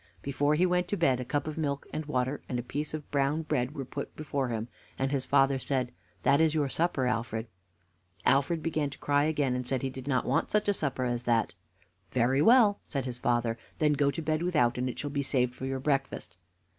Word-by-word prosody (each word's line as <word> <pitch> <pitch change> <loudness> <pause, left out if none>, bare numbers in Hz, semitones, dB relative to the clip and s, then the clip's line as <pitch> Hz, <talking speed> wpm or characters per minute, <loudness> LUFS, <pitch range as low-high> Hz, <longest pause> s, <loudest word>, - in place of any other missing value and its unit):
Before 145 +2 +1
he 175 +4 +3
went 180 0 +1
to 205 - -1
bed, 130 -7 +3
a - - -2
cup 145 +4 -1
of 155 +1 -4
milk 140 -2 -1
and 155 -1 -3
water 130 0 -1
and 125 - -1
a 120 - -2
piece 150 +5 -3
of 150 -2 -8
brown 145 +3 +1
bread 130 -1 -1
were 135 -3 -4
put 140 +2 -6
before 140 -3 -2
him, 115 -1 -3 0.3
and 135 +1 0
his 135 -2 -1
father 135 -1 +4
said: 130 -2 -1 0.3
"That 140 +3 +4
is 160 -1 +3
your 145 -3 +1
supper, 160 -4 0
Alfred." 115 -2 -1 0.8
Alfred 155 +4 +3
began 155 -3 0
to 140 - -10
cry 145 0 +2
again, 150 -4 +1
and 125 -1 -3
said 130 -1 -1
he 135 - -1
did 130 0 -9
not 130 -3 +1
want - - +1
such 210 0 +1
a 205 - +4
supper 135 -7 -1
as 120 -1 -1
that. 115 -2 +2 0.6
"Very 130 +5 +2
well," 225 -1 +6
said 135 -3 -3
his 125 -1 -5
father, 120 -2 0 0.2
"then 150 -1 +3
go 145 -1 +2
to 165 +3 -3
bed 155 0 0
without, 150 -9 +2
and 125 +1 0
it 120 - -6
shall 145 - -3
be 140 0 0
saved 125 -3 +1
for 130 - -5
your 135 0 -2
breakfast." 135 - -1
140 Hz, 230 wpm, -29 LUFS, 125-150 Hz, 0.8 s, well